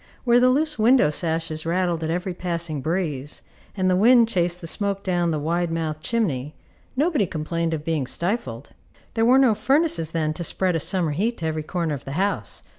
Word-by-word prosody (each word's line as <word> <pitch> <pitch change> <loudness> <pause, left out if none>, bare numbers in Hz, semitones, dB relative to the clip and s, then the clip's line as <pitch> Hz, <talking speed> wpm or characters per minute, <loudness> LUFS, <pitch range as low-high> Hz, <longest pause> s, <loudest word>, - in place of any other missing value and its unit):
Where 240 -1 +4
the 250 +1 +5
loose 300 +1 0
window 230 - +5
sashes 160 -1 -2
rattled 170 -1 0
at 160 - -2
every 180 +2 -2
passing 170 -4 -3
breeze, 155 -3 -3 0.3
and 185 -1 +1
the 185 - +3
wind 230 +4 +6
chased 175 -4 0
the 175 - -9
smoke 200 +3 -2
down 175 -2 0
the 155 - 0
wide 170 +3 -1
mouthed 160 -2 -3
chimney, 155 - -1 0.4
nobody 285 - +1
complained 165 +1 -2
of 150 -1 -7
being 155 -6 -1
stifled. 160 - -2 0.4
There 225 0 +2
were 255 +3 +6
no 260 -4 +5
furnaces 260 - +1
then 155 -2 -1
to 170 - -5
spread 180 +2 0
a - - +1
summer 175 -1 0
heat 215 +10 -1
to 165 - -5
every 155 -1 -1
corner 165 0 -2
of 140 - -6
the 135 - -5
house. 195 +6 -2
175 Hz, 195 wpm, -23 LUFS, 160-210 Hz, 0.4 s, wind